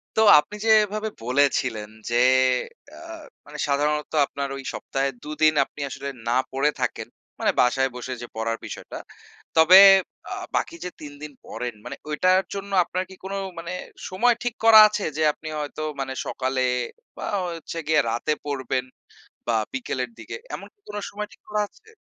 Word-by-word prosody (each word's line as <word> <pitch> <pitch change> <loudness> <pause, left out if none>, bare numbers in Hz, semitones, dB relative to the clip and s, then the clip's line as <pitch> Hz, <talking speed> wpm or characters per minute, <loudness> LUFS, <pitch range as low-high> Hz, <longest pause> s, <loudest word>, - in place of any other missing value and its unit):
তো 220 - +4 0.2
আপনি 210 - -6
যে - - +2
এভাবে 215 +1 -3
বলেছিলেন 125 -5 +1 0.2
যে, 120 - -1 0.8
আ - - -13 0.5
মানে 150 +1 -10
সাধারণত 150 +1 0
আপনার 140 0 -4
ওই 135 - -7
সপ্তাহে 135 0 -2
২ 150 - -8
দিন 155 0 +6
আপনি - - -17
আসলে 140 - -5 0.2
না 120 +2 +2
পড়ে 135 +3 +2
থাকেন, - - -2 0.3
মানে - - +2
বাসায় 130 +2 +3
বসে 125 +1 -5
যে 120 - -6
পড়ার 115 0 -1
বিষয়টা। - - -8 0.6
তবে 170 +4 +9 0.5
আ - - -2 0.2
বাকি 335 - -1
যে - - -2
৩ 145 -1 -8
দিন 150 -1 -7
পড়েন 125 -2 -5
মানে - - -6
ঐটার 185 +5 +3
জন্য 200 0 -6
আপনার 185 +2 -3
কি 190 - -11
কোন 195 +1 -5 0.3
মানে 170 +2 -6 0.4
সময় 235 +6 +3
ঠিক 240 -1 -2
করা 220 -1 +10
আছে? 210 -1 -3
যে - - -1
আপনি 155 - -11
হয়তো 150 +1 -5 0.2
মানে 135 -1 -3
সকালে 130 0 -1 0.6
বা - - -5 0.2
হচ্ছে 165 -1 -6
গিয়ে 155 -2 +4
রাতে 120 +6 0
পড়বেন 130 -2 -2 0.6
বা 120 - +1 0.2
বিকেলের 130 -1 -3
দিকে, - - -8 0.2
এমন - - -7
কি 410 - -48
কোন 210 - -6
সময় 210 0 -5
ঠিক - - -19
করা 210 0 0
আছে? 440 - -25
150 Hz, 170 wpm, -24 LUFS, 130-190 Hz, 0.8 s, করা